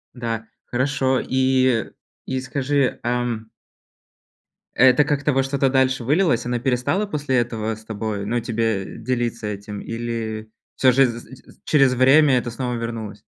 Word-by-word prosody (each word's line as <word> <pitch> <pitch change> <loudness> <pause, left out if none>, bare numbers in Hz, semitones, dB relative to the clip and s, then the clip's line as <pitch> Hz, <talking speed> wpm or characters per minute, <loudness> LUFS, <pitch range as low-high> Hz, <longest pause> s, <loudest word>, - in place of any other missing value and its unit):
Да, 115 -2 -4 0.2
хорошо. 130 +1 0
И 130 -3 +2 0.4
и 130 - -2
скажи, 140 0 0
ам 120 -2 -2 1.3
Это 130 +3 +6
как-то 145 +1 0
во 135 0 +2
что-то 135 0 +1
дальше 130 -1 +2
вылилось? 150 -1 +2
Она 120 0 -1
перестала 130 - 0
после 145 -8 -1
этого 110 -2 -1
с 110 +1 -16
тобой 105 -2 -4
ну, 120 +3 -1
тебе 115 -5 -2
делиться 120 -2 -2
этим, 105 0 -6
или 115 -2 -5 0.2
всё 130 -1 +4
же 135 +2 +5
з 115 -1 -3
з 130 +2 -15
з - - -24
через 135 -4 +4
время 135 +2 +5
это 120 -1 -2
снова 125 +1 -3
вернулось? 115 -3 -5
125 Hz, 150 wpm, -22 LUFS, 115-130 Hz, 1.3 s, Это